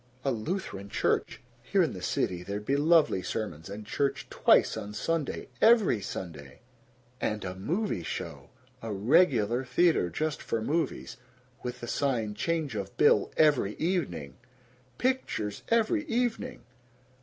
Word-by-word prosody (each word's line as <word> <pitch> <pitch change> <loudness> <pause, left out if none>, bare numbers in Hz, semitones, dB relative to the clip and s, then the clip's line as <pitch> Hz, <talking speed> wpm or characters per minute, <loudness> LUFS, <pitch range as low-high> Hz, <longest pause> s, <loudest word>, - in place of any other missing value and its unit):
A 135 - +2
Lutheran 110 - -4
Church. - - 0 0.2
Here 185 +10 +2
in 160 - -1
the 90 - -7
city 90 0 -1
there'd 100 +3 -5
be 135 - +1
lovely 155 - +4
sermons, 90 -4 -4
and 105 +2 -7
church 140 +5 -1
twice - - +4
on 105 +1 -6
Sunday, 165 0 -2
EVERY 220 - +5
Sunday! 75 -7 -7 0.6
And 105 -2 -1
a 90 - -3
movie 160 - -2
show! - - -6 0.3
A 115 - -5
regular 120 - +3
theater, 155 - +2
just 155 - -2
for 115 - -2
movies. 150 +6 -2 0.4
With 125 0 -5
the 120 - -5
sign 120 -6 0
"Change 160 +1 -1
of 100 -2 -5
bill 145 - +4
every 145 -10 +3
evening." 110 - -2 0.6
Pictures 245 - -1
every 230 +7 +2
evening! 240 - -2
125 Hz, 135 wpm, -29 LUFS, 100-165 Hz, 0.6 s, EVERY